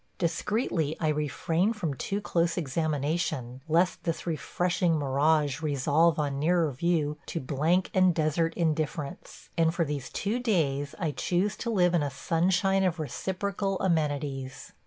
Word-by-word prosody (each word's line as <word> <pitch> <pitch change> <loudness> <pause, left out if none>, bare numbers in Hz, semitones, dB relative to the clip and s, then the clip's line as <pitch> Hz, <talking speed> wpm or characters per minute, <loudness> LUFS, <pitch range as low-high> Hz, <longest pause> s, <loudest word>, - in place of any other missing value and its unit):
Discreetly 170 - -1
I 155 - +1
refrain 160 +6 0
from 175 -9 -3
too 195 +9 -3
close 170 -3 0
examination, 150 -4 -1
lest 175 +3 +2
this 165 -2 -2
refreshing 175 +1 0
mirage 145 +1 +1
resolve 150 +2 +2
on 140 -2 -1
nearer 165 0 +2
view 150 +1 0
to 165 - -3
blank 155 +7 +1
and 185 -1 +5
desert 165 0 0
indifference, 155 0 -3
and 165 0 +3
for 170 - +1
these 145 -3 -4
two 215 +5 -2
days 145 - 0
I 165 -4 -1
choose 185 +7 0
to 235 - -3
live 180 -5 +3
in 170 - +3
a 145 - 0
sunshine 180 +7 +1
of 180 -2 +1
reciprocal 195 +6 -2
amenities. 145 -6 -2
160 Hz, 140 wpm, -28 LUFS, 145-180 Hz, -, and